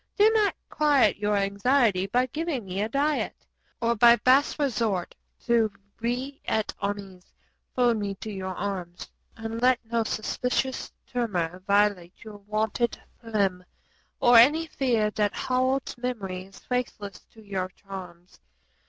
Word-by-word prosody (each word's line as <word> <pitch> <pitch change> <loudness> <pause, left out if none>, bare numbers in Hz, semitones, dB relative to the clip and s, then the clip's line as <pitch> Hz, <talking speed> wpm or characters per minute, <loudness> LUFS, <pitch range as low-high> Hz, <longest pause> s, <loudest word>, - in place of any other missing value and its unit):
Do 425 +1 +6
not 430 -2 +2
quiet 290 -8 +3
your 210 0 0
anxiety 200 0 +2
by 245 +5 +2
giving 295 -3 -3
me 190 +1 -3
a 215 - -1
diet, 285 +4 -1 0.3
Or 235 0 +1
by 235 +2 +7
base 260 +4 +3
resort 225 - -1 0.3
to 230 -3 +3 0.3
vi 250 +4 -3
et 220 -1 -1
armis 200 -2 -4 0.5
fold 245 -2 +3
me 200 -2 -3
to 215 +3 -7
your 190 -2 -5
arms, 180 -3 -5 0.3
And 225 +1 -5
let 255 0 +4
no 230 0 0
suspicious 250 +4 -2
tremor 185 -8 -2
violate 200 -3 +1
your 215 -2 -10
wonted 215 +3 -1 0.2
phlegm 200 -6 -1 0.6
or 240 -1 +6
Any 295 +8 +6
fear 235 -8 0
that 210 -1 0
Harold's 255 +1 0
memory 195 -7 -4
is 195 0 -16
faithless 245 -5 -4
to 220 - -15
your 190 -3 -3
charms. 185 -2 -11
220 Hz, 135 wpm, -26 LUFS, 195-250 Hz, 0.6 s, by